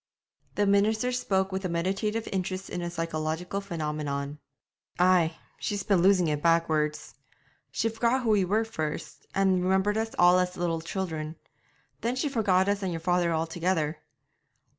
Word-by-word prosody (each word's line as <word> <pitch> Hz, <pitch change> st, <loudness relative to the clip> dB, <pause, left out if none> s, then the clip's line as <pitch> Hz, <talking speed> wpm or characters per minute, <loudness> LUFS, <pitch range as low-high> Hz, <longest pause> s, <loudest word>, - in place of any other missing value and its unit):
The 205 Hz, -, +2 dB
minister 215 Hz, +4 st, +2 dB
spoke 195 Hz, -6 st, 0 dB
with 190 Hz, +1 st, -3 dB
a 185 Hz, -, -1 dB
meditative 195 Hz, +6 st, -1 dB
interest 190 Hz, 0 st, -3 dB
in 175 Hz, -, -3 dB
a 175 Hz, -, -3 dB
psychological 165 Hz, +2 st, -3 dB
phenomenon. 150 Hz, -5 st, -3 dB, 0.6 s
'Ay, 175 Hz, -2 st, +3 dB, 0.2 s
she's 205 Hz, -3 st, -2 dB
been 195 Hz, -4 st, +3 dB
losing 185 Hz, -2 st, +4 dB
it 150 Hz, -1 st, -1 dB
backwards; 160 Hz, -2 st, +1 dB, 0.6 s
she -, -, 0 dB
forgot 235 Hz, +3 st, +1 dB
who 225 Hz, -, +2 dB
we 205 Hz, -2 st, +4 dB
were 210 Hz, +5 st, +1 dB
first, 155 Hz, -10 st, -5 dB
and 190 Hz, -2 st, +3 dB
remembered 190 Hz, +3 st, +2 dB
us 225 Hz, 0 st, -3 dB
all 180 Hz, +1 st, +6 dB
as 180 Hz, 0 st, -1 dB
little 170 Hz, -2 st, -1 dB
children; 160 Hz, -3 st, -4 dB, 0.6 s
then 240 Hz, +2 st, -1 dB
she 275 Hz, +3 st, -1 dB
forgot 200 Hz, -7 st, +2 dB
us 200 Hz, 0 st, +1 dB
and 190 Hz, -2 st, -2 dB
your 165 Hz, -, -3 dB
father 175 Hz, 0 st, +1 dB
altogether. 165 Hz, -1 st, -1 dB
185 Hz, 155 wpm, -28 LUFS, 165-200 Hz, 0.6 s, all